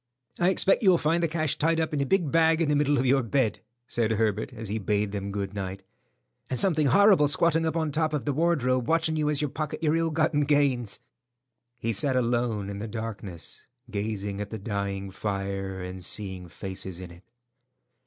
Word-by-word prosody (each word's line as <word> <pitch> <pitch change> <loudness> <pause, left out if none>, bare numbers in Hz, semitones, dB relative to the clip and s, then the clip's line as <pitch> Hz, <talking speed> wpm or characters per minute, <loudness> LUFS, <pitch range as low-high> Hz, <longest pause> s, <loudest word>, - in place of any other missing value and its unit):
"I 175 - +4
expect 190 +1 +3
you'll 190 -5 +5
find 165 +2 +1
the 170 - +2
cash 155 -2 -1
tied 165 +1 +2
up 160 -1 -1
in 145 - 0
a 140 - 0
big 175 -5 +1
bag 165 0 +4
in 165 -3 +1
the 150 - +3
middle 145 0 +2
of 130 - +1
your 135 +1 +4
bed," 120 -1 0 0.3
said 115 -3 0
Herbert, 110 0 0
as 115 -3 -7
he 105 +3 -2
bade 105 0 0
them 100 -1 -4
good 100 -1 -3
night, 95 -1 -5 0.7
"and 130 - -1
something 160 -6 +3
horrible 195 - +6
squatting 165 +2 +2
up 160 - -2
on 160 -2 0
top 155 +1 +1
of 150 -3 -2
the 145 - 0
wardrobe 130 -6 +1
watching 160 -1 +2
you 150 -1 +1
as 150 -1 0
you - - +1
pocket 155 +3 -5
your 155 0 +3
ill 165 0 +1
gotten 155 -1 +1
gains." 140 -6 +1 0.8
He 115 -1 -2
sat 130 +6 +2
alone 120 -4 0
in 100 0 -5
the 110 - -4
darkness, 105 -6 -6 0.3
gazing 100 -1 -3
at 105 - -5
the 110 - -5
dying 100 -2 -3
fire, 95 -1 -3
and 90 0 -7
seeing 95 -2 -3
faces 95 0 -5
in 90 -2 -8
it. 85 +2 -15
125 Hz, 205 wpm, -27 LUFS, 100-155 Hz, 0.8 s, horrible